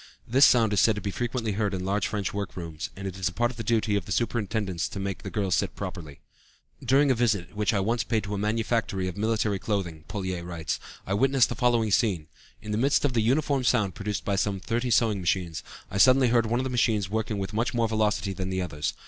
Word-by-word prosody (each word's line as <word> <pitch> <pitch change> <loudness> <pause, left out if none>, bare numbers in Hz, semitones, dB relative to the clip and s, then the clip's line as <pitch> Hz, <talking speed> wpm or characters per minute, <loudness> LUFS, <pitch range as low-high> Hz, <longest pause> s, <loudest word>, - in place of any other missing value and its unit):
This 130 +4 +6
sound 115 -4 +4
is 105 - +3
said 110 - +4
to - - -3
be 100 - -3
frequently 120 0 -2
heard 100 -1 -1
in 90 0 -4
large 100 +1 0
French 100 -3 -3
workrooms, 85 -5 -5
and 95 0 -6
it 95 0 -6
is 95 - +1
part 120 +6 0
of 125 - -14
the 115 - -4
duty 110 -1 +1
of 100 -4 -1
the 100 - -8
superintendents 105 -5 -1
of - - -12
the - - -4
rooms - - -3
to - - 0
make 95 -2 -4
the - - -6
girls 100 -4 -1
sit - - 0
properly. 75 -4 -7 0.6
"During 140 +1 +4
a - - +5
visit 110 -6 0
which 105 -1 +1
I 100 - +1
once 115 +3 0
paid 110 -1 -1
to 105 -1 -5
a - - -1
manufactory 105 -3 0
of 90 - -5
military 105 -1 0
clothing," 85 -8 -3
Pouillet 95 -3 -3
writes, 85 -2 -4 0.3
"I 95 - -2
witnessed 135 +4 +3
the - - -2
following 115 -2 +2
scene. 90 -5 +1 0.3
In 105 - -5
the 105 - 0
midst 140 +3 +2
of 135 - +1
the 115 - +2
uniform 135 +3 +1
sound 105 -5 +2
produced 105 0 -4
by 100 -1 0
some 100 -1 0
thirty 120 +6 -2
sewing 110 -3 +3
machines, 85 -2 -1 0.3
I 100 - -2
suddenly 130 +2 +6
heard 115 -1 +3
one 120 +2 0
of - - 0
the 130 - -3
machines 110 -5 +1
working 110 -1 -1
with 95 0 -4
much 120 +3 -1
more 115 -1 +2
velocity 105 -3 0
than 95 0 -4
the 95 0 -2
others. 75 -5 -3
105 Hz, 250 wpm, -27 LUFS, 95-115 Hz, 0.6 s, This